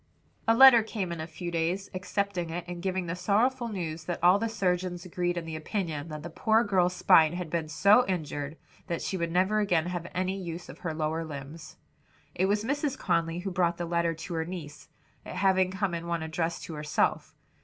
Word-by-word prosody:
A 225 - +5
letter 260 -2 +9
came 210 -5 -4
in 170 -2 -4
a 160 - -5
few 170 +2 -6
days, 170 +4 -1
accepting 190 -2 -2
it 175 +1 -4
and 175 -1 -6
giving 185 -1 -1
the 170 0 -3
sorrowful 235 +7 +1
news 165 -7 -4
that 175 - -2
all 180 +3 +6
the 230 +1 -1
surgeons 180 -4 -1
agreed 175 -1 -2
in 170 - -3
the 160 -1 -5
opinion 155 -2 -3
that 155 -1 -7
the 170 - -6
poor 220 +6 +3
girl's 180 -3 +2
spine 160 -2 +5
had 175 -3 -5
been 165 -2 -2
so 200 +9 +5
injured 155 -4 -3 0.3
that 170 - -3
she - - -2
would 170 -2 -2
never 190 +5 +2
again 180 -6 +2
have 175 -1 -4
any 185 +2 -1
use 170 0 -6
of - - -10
her 160 -3 -4
lower 160 +1 -1
limbs. 150 +1 -8 0.6
It 185 - +1
was 205 +1 +1
Mrs 280 +2 -1
Conly 165 +1 0
who 195 +1 -4
brought 175 -1 +1
the 175 - -3
letter 170 0 0
to 165 +3 -7
her 160 -1 0
niece, 160 -4 -8 0.3
it - - -8
having 190 -1 +3
come 190 -1 -2
in 170 0 -4
one 170 -1 -1
addressed 165 +1 -2
to 165 - -7
herself. 150 0 -1
175 Hz, 210 wpm, -28 LUFS, 165-190 Hz, 0.6 s, letter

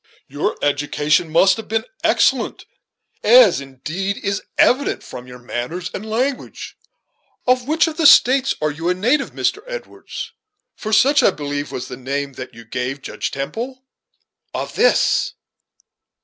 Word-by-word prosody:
Your 145 +2 -2
education 145 +3 +1
must 190 +4 +4
have 225 - -8
been 225 +1 -1 0.2
excellent; - - +2 0.6
as - - +6
indeed 155 +9 -4
is 200 0 -2 0.2
evident 270 +3 +2
from 125 0 -9
your 125 0 -10
manners 125 +8 -5
and 195 - -5
language. 255 +5 -3 0.7
Of 255 0 +2
which 315 +2 +3
of 320 -1 -4
the 325 -3 +5
States 265 +1 +5
are 155 - +1
you 165 +4 -3
a 180 - +2
native, 250 +10 +1
Mr. - - -1
Edwards? - - -7 0.4
for 215 - -6
such, 280 +6 +5
I - - +5
believe, 145 -4 -4
was 125 - -5
the 125 - -8
name 140 +2 -3
that 130 0 -9
you 115 0 -12
gave 125 +4 -4
Judge - - -4
Temple." 240 - -5 0.7
"Of - - -4
this." 485 - +2
180 Hz, 150 wpm, -20 LUFS, -, 0.7 s, as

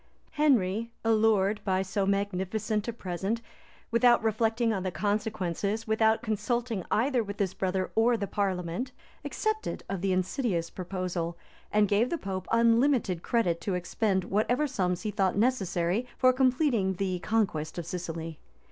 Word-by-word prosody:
[] - - -35
Henry, 230 -5 +2
allured 215 -2 +3
by 190 -1 +1
so 195 +1 -1
magnificent 200 +2 -1
a - - 0
present, 195 +2 -3 0.5
without 240 0 +4
reflecting 225 +1 +1
on 195 - -2
the 185 - -1
consequences, 205 0 -1
without 220 0 +2
consulting 225 -1 -1
either 245 +1 +2
with 200 -1 -7
his 190 -2 0
brother 185 0 -1
or 230 +2 +3
the 205 - -2
parliament, 195 +5 -2 0.3
accepted 435 0 -2
of 195 -3 -3
the 195 0 +1
insidious 185 -1 -1
proposal, 180 -2 -3 0.3
and 210 0 +4
gave 210 +5 +2
the 340 - -1
pope 190 - -5
unlimited 230 - +3
credit 175 -8 0
to 190 0 -1
expend 190 +2 0
whatever 240 +10 +1
sums 185 -10 -1
he 215 - -2
thought 190 -2 +1
necessary 200 -2 +1
for 255 0 +5
completing 255 -7 +2
the 185 -1 -1
conquest 180 -8 -1
of 170 - -4
Sicily. 165 -2 -5
205 Hz, 145 wpm, -28 LUFS, 185-230 Hz, 0.5 s, for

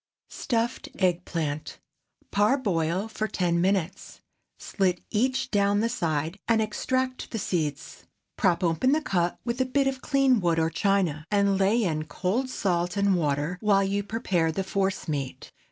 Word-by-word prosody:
STUFFED 235 +1 -2
EGG 180 -2 +1
PLANT. 155 -3 -3 0.5
✠ - - -45
Parboil 200 - +1
for 220 0 -3
ten 175 -4 0
minutes. 190 0 -1 0.4
Slit 185 -3 0
each 255 +4 0
down 200 0 +2
the 230 - +1
side, 165 -4 -2
and 230 -1 +3
extract 255 +4 -1
the 225 - -4
seeds. 155 -8 -3 0.3
Prop 185 -2 +1
open 170 - +2
the 310 - +2
cut 175 -6 0
with 240 +1 -1
a - - +5
bit 275 +2 +1
of 265 -1 -1
clean 270 -4 +3
wood 170 -2 +1
or 160 0 +1
china, 170 -4 0
and 200 -1 +2
lay 210 +5 +3
in 155 -4 -1
cold 190 - -1
salt 180 -5 -1
and 200 -1 +3
water 150 +2 -1
while 200 -2 +3
you 200 +1 0
prepare 195 -6 0
the 190 +4 -2
force 190 0 -1
meat. 140 -4 -4
195 Hz, 160 wpm, -26 LUFS, 170-225 Hz, 0.5 s, a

